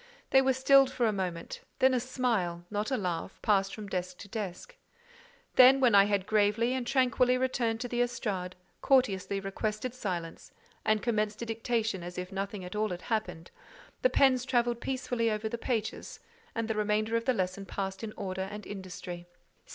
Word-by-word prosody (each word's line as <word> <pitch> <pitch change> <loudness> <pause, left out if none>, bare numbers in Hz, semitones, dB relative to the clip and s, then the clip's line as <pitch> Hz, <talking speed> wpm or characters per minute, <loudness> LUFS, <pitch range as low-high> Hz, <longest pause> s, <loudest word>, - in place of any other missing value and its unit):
They 265 - +7
were 265 0 +3
stilled 270 +1 +5
for 250 -2 0
a 220 - +2
moment; 180 -4 -4 0.2
then 260 0 +4
a 250 - +2
smile—not 210 -6 -1
a 260 - 0
laugh—passed 195 +2 -1
from 215 - -7
desk 180 -2 -4
to - - -10
desk: 210 - -6 0.8
then—when 255 -2 +7
I 200 0 +8
had 200 -2 0
gravely 215 +3 +2
and 255 -2 -2
tranquilly 250 -1 +3
returned 245 -3 0
to 250 - -2
the 240 0 -1
estrade, 195 -7 -2 0.3
courteously 200 -7 +2
requested 215 +4 -3
silence, 180 -9 -5 0.3
and 215 -1 +1
commenced 215 -1 0
a - - -3
dictation 225 -3 -1
as 175 +1 -8
if 180 +1 -5
nothing 195 0 -4
at 180 - -7
all 215 0 0
had 180 -1 -6
happened—the 220 - -4
pens 260 - +4
travelled 240 -2 +1
peacefully 250 -3 -1
over 215 0 -1
the 235 +2 -4
pages, 225 -4 -3 0.4
and 230 -1 -1
the 220 - 0
remainder 215 +1 0
of 230 0 0
the 255 - +3
lesson 190 0 -2
passed 195 +1 -4
in 220 - -4
order 190 -1 -3
and 210 0 -8
industry. 180 -3 -7
215 Hz, 170 wpm, -30 LUFS, 195-245 Hz, 0.8 s, I